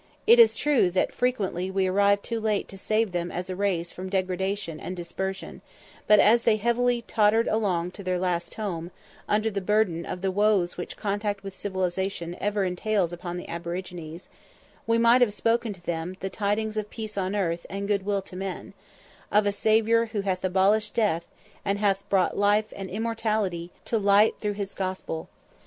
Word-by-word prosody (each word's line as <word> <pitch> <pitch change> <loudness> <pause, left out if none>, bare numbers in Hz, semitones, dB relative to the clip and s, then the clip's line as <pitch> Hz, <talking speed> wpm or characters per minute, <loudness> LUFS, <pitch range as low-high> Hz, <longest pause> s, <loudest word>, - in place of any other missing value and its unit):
It 465 +2 +7
is 460 - +7
true 285 -11 +3
that 180 +1 0
frequently 195 -7 -1
we 190 0 +1
arrived 200 +2 +3
too 230 -1 -3
late 215 -2 0
to 195 - -9
save 215 0 +1
them 175 0 -2
as 180 +1 -4
a - - -3
race 180 -4 -1
from 185 +1 -7
degradation 190 -2 -2
and 185 - -6
dispersion; 190 +2 -5 0.5
but 210 -1 +7
as 230 +4 +6
they 230 -2 +3
heavily 235 +2 +1
tottered 220 +1 +3
along 180 -5 0
to 200 - -10
their 185 -1 0
last 175 -1 -2
home, 175 -6 -4 0.4
under 215 +1 +2
the 200 -1 -2
burden 190 -4 +1
of 180 - -5
the 190 0 0
woes 200 -3 +2
which 175 - -6
contact 205 -1 -2
with 195 -1 -7
civilization 190 -2 -2
ever 205 0 0
entails 185 0 0
upon 175 0 -5
the 180 - -7
aborigines, 170 -1 -6 0.6
we 230 0 +3
might 235 +2 +5
have 215 -4 +3
spoken 230 +3 +1
to 180 -3 -12
them 170 +2 -3
the 190 0 -4
tidings 215 +2 -1
of 210 -1 -2
"peace 215 -2 -6
on 190 0 -1
earth 170 -4 -1
and 200 +1 -4
good 200 -2 +1
will 200 -1 -1
to 185 - -12
men" 190 0 -5 0.6
of 210 0 +4
a 205 - +2
Saviour 220 +3 +3
"who 220 -2 -2
hath 190 -2 -2
abolished 195 +3 +2
death, 200 -7 +1 0.4
and 200 0 0
hath 200 -1 0
brought 190 -2 +2
life 205 +1 +2
and 195 -1 -6
immortality 215 -5 -1 0.2
to 225 - 0
light 205 +1 +5
through 210 -1 -1
his 200 -1 -5
gospel." 185 -4 -4
200 Hz, 185 wpm, -26 LUFS, 185-215 Hz, 0.6 s, It